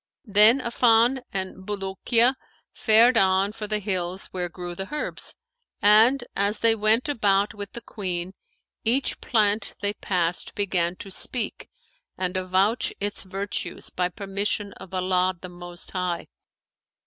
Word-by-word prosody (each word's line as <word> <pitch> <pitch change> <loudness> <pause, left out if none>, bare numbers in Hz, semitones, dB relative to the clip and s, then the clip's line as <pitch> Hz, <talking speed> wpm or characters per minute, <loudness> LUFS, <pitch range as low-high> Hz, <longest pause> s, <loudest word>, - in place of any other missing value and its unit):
Then 215 +5 +6
Affan 235 +1 +3
and 190 -1 -4
Bulukiya 210 +5 +1 0.4
fared 230 +2 +5
on 190 +1 +3
for 210 -1 -6
the 215 0 +1
hills 185 -2 -3
where 180 -1 -3
grew 175 +1 -7
the 195 +3 -6
herbs; 300 - -2 0.4
and, 220 +6 +5
as 200 +2 +1
they 230 0 +4
went 220 +4 +2
about 205 -7 +1
with 205 -2 -7
the 235 - -6
Queen, 185 -5 -4 0.5
each 250 +5 0
plant 210 -2 +1
they 205 0 0
passed 180 -4 -2
began 180 -4 0
to 195 - -9
speak 235 +4 -1 0.5
and 185 0 -2
avouch 185 +4 +1
its 205 +1 -2
virtues 195 +1 -4
by 180 0 0
permission 200 +1 -3
of 190 - -12
Allah 185 0 +1
the 185 - -8
Most 175 0 -7
High. 180 -2 -2
200 Hz, 135 wpm, -25 LUFS, 185-220 Hz, 0.5 s, Then